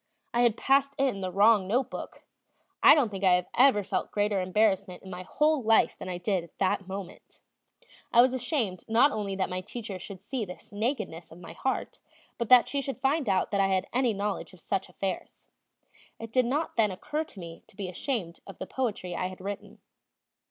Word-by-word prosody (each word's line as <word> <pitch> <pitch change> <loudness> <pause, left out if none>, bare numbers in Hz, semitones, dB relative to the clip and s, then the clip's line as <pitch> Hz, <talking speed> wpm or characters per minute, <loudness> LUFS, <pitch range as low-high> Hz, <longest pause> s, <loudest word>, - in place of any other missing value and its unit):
I 240 - +2
had 235 -2 +3
passed 275 +1 +2
in 260 -8 0
the 185 -1 -3
wrong 205 0 +4
note 250 +5 0
book. - - -8 0.6
I - - +9
don't 275 -7 +2
think 195 -1 -6
I 180 -1 +4
have 250 -6 +4
felt - - -2
greater 205 -2 +1
embarrassment 190 -1 +1
in 190 - -10
my 180 -1 -6
whole 300 +9 +1
life 225 -1 +3
than - - -6
I 180 - -3
did 180 0 -1
at 170 - -17
that 195 0 0
moment. 190 -1 -9 0.7
I 235 - +5
was 255 +1 +6
ashamed 245 - -1
not 240 +6 +5
only 205 -4 -3
that 190 - 0
my 185 0 -3
teacher 205 -1 -7
should 190 0 -9
see 255 +1 -3
this 180 -3 -10
nakedness 205 - -3
of 165 - -12
my 170 -2 -10
heart, 265 +9 -3 0.4
but 235 - -2
that 250 -1 +8
she 280 - -1
should 270 0 -4
find 275 -2 +1
out 190 -1 +1
that 200 -1 +2
I 195 - +3
had 190 -1 +1
any 250 -1 +2
knowledge 200 -1 -3
of 185 - -15
such 190 +2 -2
affairs. 190 +1 -5 0.7
It 225 -1 -8
did 255 0 +3
not 295 +6 -1
then 220 -2 +4
occur 300 +11 -3
to 210 - -13
me 170 -1 -9
to - - -17
be 200 -3 -3
ashamed 180 - -3
of 195 - -10
the - - -5
kind - - -23
of - - -22
poetry 205 -8 -2
I 180 - -1
had 185 0 -9
written. 200 +1 -7
205 Hz, 215 wpm, -28 LUFS, 185-245 Hz, 0.7 s, I